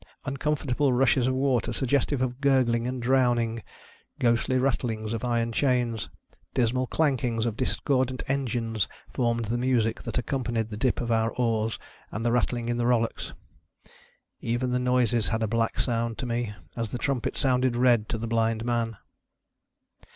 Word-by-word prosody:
Uncomfortable 140 0 0
rushes 125 0 +3
of 130 - +1
water 130 -3 +1
suggestive 135 0 +1
of 125 +1 -3
gurgling 125 -4 +3
and 125 -1 -3
drowning, 120 -3 +2 0.6
ghostly 120 +2 +2
rattlings 115 -4 -1
of 115 - -3
iron 120 -1 0
chains, 120 -3 0 0.5
dismal 125 +1 +1
clankiugs 125 -7 +1
of 115 -3 -1
discordant 130 0 0
engines, 115 -6 -1 0.3
formed 115 -2 0
the 115 +3 -1
rauaie 120 -3 +1
that - - -4
accompanied 120 -2 -1
the - - -4
dip 125 +3 0
of 120 -1 -2
our 115 0 +2
oars 115 -2 0 0.3
and 110 +1 -4
their 120 - +2
rattling 120 -1 0
in 120 0 0
the 120 0 +1
rullocks. 115 -2 0 1.1
Even 120 +2 -1
the 125 - +1
noises 125 -2 +2
had 110 0 0
a - - +1
black 115 +1 0
sound 115 -2 -1
to 130 - -4
me 120 -2 -2
— 80 - -32
as 115 -2 -2
the 125 - -4
trumpet 135 -1 -1
sounded 130 -2 +2
red 120 -3 +3
to - - -1
the 115 - -4
blind 115 0 0
man. 115 -3 -1
120 Hz, 160 wpm, -27 LUFS, 115-130 Hz, 1.1 s, rushes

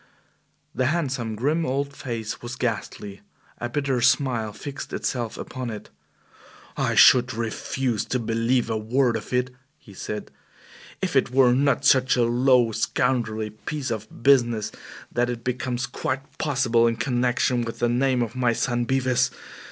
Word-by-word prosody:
The 130 0 +1
handsome, 130 -8 -1
grim 150 +9 0
old 140 +1 -2
face 115 -4 -5
was 120 0 -6
ghastly. 105 -4 -4 0.4
A 120 - -3
bitter 135 -1 -1
smile 125 -3 +2
fixed 140 +6 -8
itself 120 -4 -3
upon 130 -2 -5
it. 105 -2 -8 0.8
"I - - 0
should 130 0 +6
refuse 115 +1 -2
to 130 - -1
believe 115 +1 0
a 110 -1 -1
word 120 +3 +1
of 110 - -6
it," 125 0 0 0.3
he 100 - -16
said, 105 +2 -6 0.7
"if - - -1
it - - +3
were 125 -1 +4
not 140 +2 +2
such 130 -1 +5
a 120 - +3
low, 120 0 +3
scoundrelly 110 -1 -1
piece 130 +5 -5
of 110 +1 -6
business 120 -5 +3 0.4
that 120 0 0
it 120 -1 -4
becomes 125 0 -2
quite 130 +2 -5
possible 125 -5 +2
in 115 - +1
connection 125 0 +1
with 115 -1 -4
the 120 - +1
name 125 +1 +2
of 115 +1 -6
my 125 -2 +2
son 120 0 0
Bevis. 130 0 +2
120 Hz, 150 wpm, -24 LUFS, 115-130 Hz, 0.8 s, should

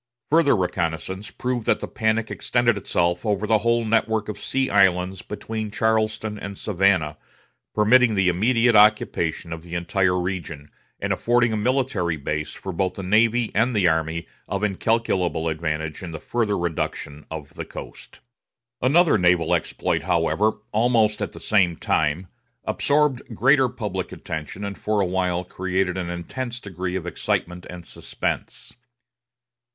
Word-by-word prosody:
Further 155 -4 +5
reconnaissance 90 +1 -2
proved 125 -2 -3
that - - +3
the - - -5
panic 110 0 0
extended 120 -2 +1
itself 85 -3 0
over 105 -2 0
the 110 0 +3
whole 115 +1 +1
network 110 -1 +1
of 105 - -5
sea 135 0 -1
islands 95 -2 +2
between 110 +1 -5
Charleston 110 0 0
and 100 -1 -7
Savannah, 90 -6 +1 0.6
permitting 115 +2 +5
the 95 -2 +2
immediate 115 +6 +3
occupation 105 -6 +3
of 80 - -7
the 85 +1 -8
entire 90 +1 +1
region, 85 -5 -5 0.3
and - - 0
affording 120 -1 +2
a - - +1
military 105 - 0
base 75 +1 -3
for 95 - -6
both 90 +1 -1
the 100 - -6
navy 110 +4 +3
and 120 +3 +2
the 100 -4 +4
army 80 0 0 0.2
of 100 +1 -3
incalculable 95 -5 0
advantage 80 -1 -3
in 90 - -6
the 80 -1 -6
further 110 -4 -1
reduction 80 -3 -3
of 80 -3 -7
the - - -5
coast. - - -11 0.6
Another 150 - +4
naval 90 -2 +3
exploit, - - 0
however, 100 +6 +1 0.2
almost 110 -1 +2
at - - -3
the - - -10
same 95 -6 +2
time, 80 +3 0 0.4
absorbed 145 -3 +2
greater 135 +3 +4
public 105 -7 -4
attention, 80 +6 -6
and 100 0 -6
for 105 -1 0
a 100 - +3
while 90 -1 0
created 90 0 -1
an 90 -2 -3
intense 120 +8 -5
degree 90 -3 -5
of 90 -2 -3
excitement 90 0 -2
and 90 -2 -9
suspense. - - -5
100 Hz, 150 wpm, -23 LUFS, 85-110 Hz, 0.6 s, Further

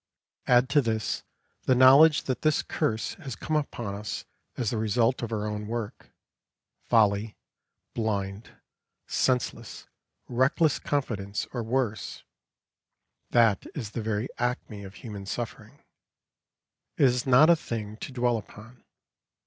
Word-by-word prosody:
Add 125 +1 +5
to 145 0 +4
this 110 -3 -1 0.4
the 130 - +4
knowledge 140 +5 +7
that 130 - -3
this 155 -1 +2
curse 115 -8 -1
has 135 -9 -6
come 155 - -3
upon 120 -8 -2
us 105 +1 -5 0.3
as 120 -4 -1
the 115 - -1
result 115 +3 +1
of 115 -1 -4
our 105 -2 -2
own 105 0 -4
work 115 -2 -5 0.8
folly, 105 -1 +3 0.6
blind, 100 -2 -2 0.6
senseless, 125 -2 -1 0.4
reckless 135 +5 +2
confidence, 105 -8 -2
or 120 - -2
worse 115 -1 -2 1.1
that 115 -4 +3
is 115 -8 -5
the 115 - -4
very 110 +2 -1
acme 120 -4 -2
of 95 0 -10
human 100 -5 -8
suffering. 120 +2 -6 1.1
It - - +5
is 125 0 +2
not 140 +6 +7
a - - +7
thing 110 -8 -5
to 135 - -7
dwell 120 -2 +1
upon. 110 +3 -14
115 Hz, 130 wpm, -27 LUFS, 105-130 Hz, 1.1 s, knowledge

